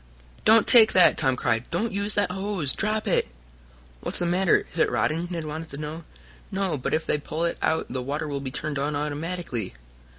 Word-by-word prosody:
"Don't 220 0 +6
take 225 -3 +7
that!" 185 - +7
Tom 130 -1 +1
cried. 115 -1 -1
"Don't 215 +7 -1
use 200 +1 -1
that 205 -3 +1
hose! 190 -7 -2
Drop 215 +1 -1
it!" 190 - +2 0.7
"What's - - -3
the 175 - -1
matter? 175 +1 +2
Is 165 - -5
it - - +4
rotten?" 165 +3 0
Ned 170 -3 -4
wanted 155 +1 -6
to 140 - -8
know. 155 +2 -6 0.5
"No, 195 -4 -1
but 130 - -1
if 160 - -2
they 150 - 0
pull 155 +3 -3
it 170 - -2
out 160 0 +1
the 130 0 -4
water 145 +5 -3
will 140 -1 -3
be 135 - -4
turned 145 +2 -4
on 145 +2 -1
automatically." 150 - -4
160 Hz, 205 wpm, -25 LUFS, 145-190 Hz, 0.7 s, take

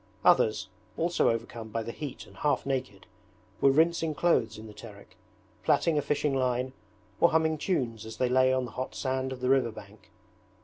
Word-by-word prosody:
Others, 110 -2 +4 0.3
also 170 +1 +2
overcome 115 0 -3
by 115 +1 -2
the 115 - -5
heat 145 +2 -7
and - - -17
half 150 - 0
naked, 130 -8 -3 0.6
were 140 - +6
rinsing 160 +2 +2
clothes 120 -10 +2
in 110 - -9
the 105 - -10
Terek, 100 -2 -13 0.5
plaiting 165 - +3
a 150 - +2
fishing 145 -1 0
line, 130 0 0 0.5
or 170 - +6
humming 160 -1 +1
tunes 120 - -1
as 110 0 -8
they 125 - +2
lay 130 +1 +4
on 130 -1 +1
the 120 - -9
hot 130 +1 -5
sand 130 0 -2
of 130 -1 -7
the 125 - 0
river 130 -3 +3
bank. 105 0 -14
130 Hz, 185 wpm, -29 LUFS, 115-145 Hz, 0.6 s, were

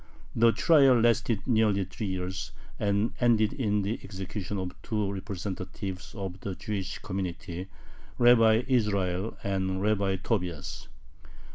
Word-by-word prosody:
The 115 0 +5
trial 135 -3 +5
lasted 115 -2 +2
nearly 110 -5 +3
three 100 +4 -5
years, 95 0 -4 0.3
and 100 +2 +1
ended 110 -3 +3
in 105 -6 0
the 105 +4 -2
execution 100 0 -5
of 95 -1 -3
two 105 -3 -1
representatives 95 -1 -5
of 95 -2 -5
the 95 -1 -5
Jewish 100 -3 -4
community, 90 -2 -5 0.5
Rabbi 115 -1 +6
Israel 100 -5 0
and 95 -1 -1
Rabbi 100 -1 +1
Tobias. 90 - -3
100 Hz, 120 wpm, -28 LUFS, 95-110 Hz, 0.5 s, Rabbi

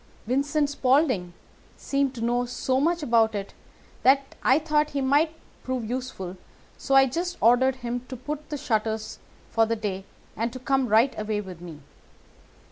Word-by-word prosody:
Vincent 285 +5 +1
Spaulding 260 - +2 0.5
seemed 275 -1 -1
to 230 - -6
know 245 +1 +1
so 255 +1 -1
much 335 +1 +1
about 225 -4 +3
it 200 -1 -5 0.5
that 275 +1 +3
I 260 - +4
thought 300 -1 +1
he - - +2
might 295 +4 +2 0.3
prove 255 -3 -3
useful, 230 -7 -5 0.4
so 270 - -1
I 270 0 +8
just 345 +7 -3
ordered 245 +3 +4
him 245 -1 -4
to 255 - -6
put 295 +4 -4
up 300 - -25
the 295 - -3
shutters 220 -5 -2 0.3
for 225 -1 +3
the 230 - 0
day 195 -3 -4 0.3
and 230 +2 -2
to - - -6
come 265 +1 +1
right 225 +5 +4
away 215 0 -1
with 185 -4 -8
me. 165 -4 -10
255 Hz, 170 wpm, -26 LUFS, 220-280 Hz, 0.5 s, I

